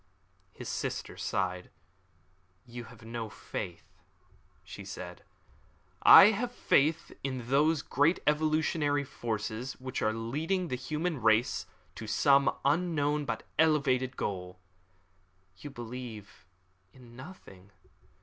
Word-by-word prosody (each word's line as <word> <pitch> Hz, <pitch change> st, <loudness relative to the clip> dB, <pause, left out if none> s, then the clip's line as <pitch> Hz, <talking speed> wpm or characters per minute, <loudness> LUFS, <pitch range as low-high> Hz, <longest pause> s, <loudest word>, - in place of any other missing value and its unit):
His -, -, -9 dB
sister -, -, -4 dB
sighed. 90 Hz, -1 st, -2 dB, 1.0 s
"You 120 Hz, -1 st, -8 dB
have 115 Hz, -2 st, -14 dB
no 115 Hz, -1 st, -5 dB
faith," 95 Hz, -3 st, -8 dB, 0.6 s
she -, -, -9 dB
said. -, -, -8 dB, 0.8 s
"I 200 Hz, +2 st, +10 dB
have 235 Hz, +3 st, -2 dB
faith 155 Hz, -, +1 dB
in 130 Hz, -3 st, -4 dB
those 150 Hz, +2 st, +3 dB
great 145 Hz, +6 st, +2 dB
evolutionary 150 Hz, -1 st, +1 dB
forces 115 Hz, 0 st, -4 dB
which 130 Hz, 0 st, -5 dB
are 110 Hz, -, +2 dB
leading 155 Hz, -, -2 dB
the 125 Hz, -, -1 dB
human 155 Hz, +3 st, -3 dB
race 110 Hz, +2 st, +2 dB, 0.3 s
to 110 Hz, -, -8 dB
some 140 Hz, +6 st, +4 dB
unknown 150 Hz, -1 st, +1 dB
but -, -, -3 dB, 0.2 s
elevated 135 Hz, -5 st, +2 dB
goal." 90 Hz, -2 st, -4 dB, 1.0 s
"You 145 Hz, -, -8 dB
believe 120 Hz, -6 st, -9 dB, 0.4 s
in 120 Hz, 0 st, -16 dB
nothing." 125 Hz, -, -12 dB
130 Hz, 110 wpm, -30 LUFS, 115-150 Hz, 1.0 s, I